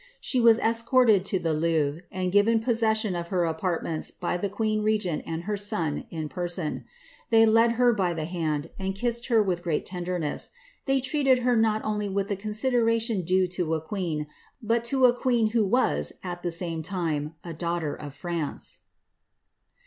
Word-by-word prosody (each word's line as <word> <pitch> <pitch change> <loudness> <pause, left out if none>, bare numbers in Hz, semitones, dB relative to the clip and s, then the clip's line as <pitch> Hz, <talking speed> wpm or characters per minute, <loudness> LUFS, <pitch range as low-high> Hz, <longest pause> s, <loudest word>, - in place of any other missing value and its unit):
She 255 - 0
was 230 -1 +6
escorted 230 -3 +3
to 195 - +1
the 165 -3 -1
Louvre, 155 -1 0
and 185 -1 -2
given 210 +3 +4
possession 220 -3 +1
of 170 -1 -4
her 175 -1 0
apartments 165 -1 -1
by 175 - -3
the 195 +3 -2
queen 215 +1 -1
regent 210 -7 0
and 165 +1 -4
her 210 +3 -2
son, 170 -7 -1
in 160 -2 -4
person; 175 0 -3 0.4
they 225 -1 +6
led 225 +1 +4
her 245 0 +4
by 185 -5 0
the 160 -1 -3
hand, 160 -3 -2
and 190 0 -2
kissed 235 +3 -1
her 230 -4 +4
with 180 -3 -1
great 170 -4 -1
tenderness; 180 -4 -2 0.4
they 270 0 +2
treated 265 -2 +2
her 250 -1 +3
not 220 -1 +2
ooly 210 -2 -2
with 195 0 -1
the 200 - 0
consideration 225 +1 +1
due 185 +2 +2
to 175 -3 -1
a - - -1
queen, 160 -3 -3 0.3
but 230 0 0
to 260 +1 +3
a 245 - +6
queen 240 -3 +1
who 225 -1 +2
was, 250 +6 +2
at 175 -1 -5
the 175 - -2
same 165 -1 -1
time, 160 -3 -3
a 170 - -6
daughter 170 -2 -2
of 145 -2 -9
France." 170 -1 -4
190 Hz, 180 wpm, -26 LUFS, 170-225 Hz, 0.4 s, was